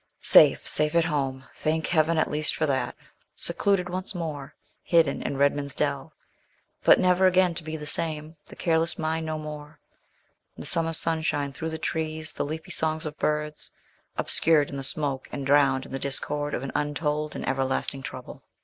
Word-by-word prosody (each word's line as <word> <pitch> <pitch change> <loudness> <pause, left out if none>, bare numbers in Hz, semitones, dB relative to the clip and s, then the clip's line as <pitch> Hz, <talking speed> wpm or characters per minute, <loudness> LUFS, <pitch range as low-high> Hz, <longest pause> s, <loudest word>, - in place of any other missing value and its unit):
Safe, - - +6
safe 150 +1 +1
at 170 -1 +4
home! 135 -4 -2
Thank 160 +1 -1
Heaven 165 0 +2
at 155 - +1
least 150 +1 0
for 155 - 0
that. 135 -3 -1 0.4
Secluded 180 +1 0
once 185 +2 -4
more 150 -4 -5 0.3
hidden 165 -5 +2
in 140 - -3
Redman's 140 0 +1
Dell; 140 +1 -1 0.7
but - - +6
never 185 0 +4
again 185 -1 +3
to 165 - -4
be 155 0 -5
the 150 - -8
same 155 +1 +1
the - - -12
careless 165 0 +1
mind 160 0 -2
no 155 0 -2
more. 150 0 -8 0.8
The - - -7
summer 165 -1 +2
sunshine 160 -3 0
through 160 +3 -4
the 160 - -4
trees, 160 0 -3
the - - -3
leafy 160 +4 -6
songs 160 -1 0
of 155 0 -6
birds, 150 0 -2 0.5
obscured 155 -3 +3
in 140 - -5
the - - -4
smoke 140 -2 -2
and 140 -1 -5
drowned 135 -1 +3
in - - -13
the 135 - -3
discord 145 +2 -1
of 125 - -4
an 135 - -5
untold 150 +1 -2
and - - -5
everlasting 135 +1 -1
trouble. - - -9
155 Hz, 175 wpm, -26 LUFS, 145-160 Hz, 0.8 s, Safe